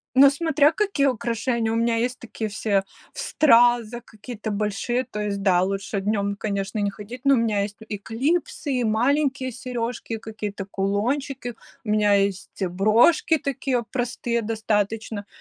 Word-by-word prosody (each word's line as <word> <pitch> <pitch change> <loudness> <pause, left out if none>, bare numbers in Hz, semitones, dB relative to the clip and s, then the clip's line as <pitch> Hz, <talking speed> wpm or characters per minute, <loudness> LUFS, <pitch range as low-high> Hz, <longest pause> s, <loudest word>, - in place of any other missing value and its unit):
Но 275 +1 +8
смотря 305 0 +3
какие 385 -7 +1
украшения, 235 -1 0
у 225 - 0
меня 230 0 +2
есть 245 +3 -1
такие, 225 -2 -5
все 205 -1 0 0.3
в - - -13
стразах, 240 -3 +3
какие-то 220 0 -7
большие, 210 +5 -1
то 210 -4 -6
есть, 200 -1 -2
да, 180 -2 +4
лучше 195 +1 -2
днем, 200 0 0
конечно, 200 0 -3
не 205 -1 +1
ходить, 220 +5 -10
но 275 0 +5
у - - +4
меня 220 -3 +1
есть 205 0 -5
и 205 -1 -4
клипсы, 280 - -1
и 250 -2 0
маленькие 260 +3 +1
сережки, 240 -2 -4
и - - -3
какие-то 210 -3 -6
кулончики. 240 +7 -2 0.3
У 210 - -3
меня 210 -1 +4
есть 195 0 -1
брошки 215 - +4
такие, 265 -3 -1
простые 240 -2 -1
достаточно, 215 -1 -2
225 Hz, 155 wpm, -24 LUFS, 205-255 Hz, 0.3 s, Но